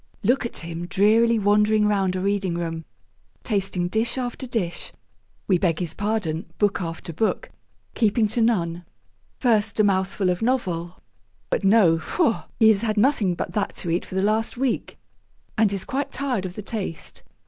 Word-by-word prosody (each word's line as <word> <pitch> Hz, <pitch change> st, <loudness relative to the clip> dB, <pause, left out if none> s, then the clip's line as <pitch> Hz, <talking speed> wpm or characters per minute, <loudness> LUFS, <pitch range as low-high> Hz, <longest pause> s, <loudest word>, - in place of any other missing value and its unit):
Look 245 Hz, +3 st, +2 dB
at -, -, -8 dB
him 170 Hz, +1 st, -6 dB
drearily 220 Hz, +5 st, +4 dB
wandering 210 Hz, +1 st, +3 dB
round 195 Hz, -3 st, +1 dB
a 185 Hz, -, -2 dB
reading 195 Hz, -2 st, 0 dB
room, 165 Hz, -1 st, -4 dB, 0.6 s
tasting 195 Hz, -4 st, -1 dB
dish 225 Hz, +6 st, -1 dB
after 255 Hz, +1 st, -4 dB
dish 200 Hz, -8 st, -3 dB, 0.6 s
we 185 Hz, -, +3 dB
beg 170 Hz, -4 st, +1 dB
his 170 Hz, -3 st, -3 dB
pardon, 205 Hz, -6 st, -2 dB
book 205 Hz, -2 st, +1 dB
after 165 Hz, -1 st, -5 dB
book 195 Hz, +3 st, -1 dB, 0.4 s
keeping 220 Hz, 0 st, +2 dB
to 235 Hz, -, 0 dB
none. 175 Hz, -7 st, +1 dB, 0.5 s
First 220 Hz, -3 st, +1 dB
a -, -, +6 dB
mouthful 190 Hz, -1 st, +1 dB
of 180 Hz, -, -3 dB
novel; 185 Hz, -8 st, -1 dB, 0.5 s
but -, -, 0 dB
no, 195 Hz, -5 st, +5 dB
faugh! 230 Hz, -, 0 dB
he 220 Hz, -, +7 dB
has 210 Hz, -2 st, +3 dB
had 220 Hz, -2 st, -1 dB
nothing 210 Hz, -6 st, +2 dB
but -, -, -4 dB
that 210 Hz, -2 st, -2 dB
to 170 Hz, -, -4 dB
eat 170 Hz, -, 0 dB
for -, -, -9 dB
the 190 Hz, -, +1 dB
last 220 Hz, +4 st, 0 dB
week, 260 Hz, -2 st, -2 dB, 0.6 s
and 215 Hz, -3 st, +3 dB
is 195 Hz, -1 st, -3 dB
quite 275 Hz, +1 st, -2 dB
tired 250 Hz, -9 st, -2 dB
of 180 Hz, -, -10 dB
the 210 Hz, -, -6 dB
taste. 195 Hz, -7 st, -5 dB
205 Hz, 170 wpm, -24 LUFS, 180-225 Hz, 0.6 s, he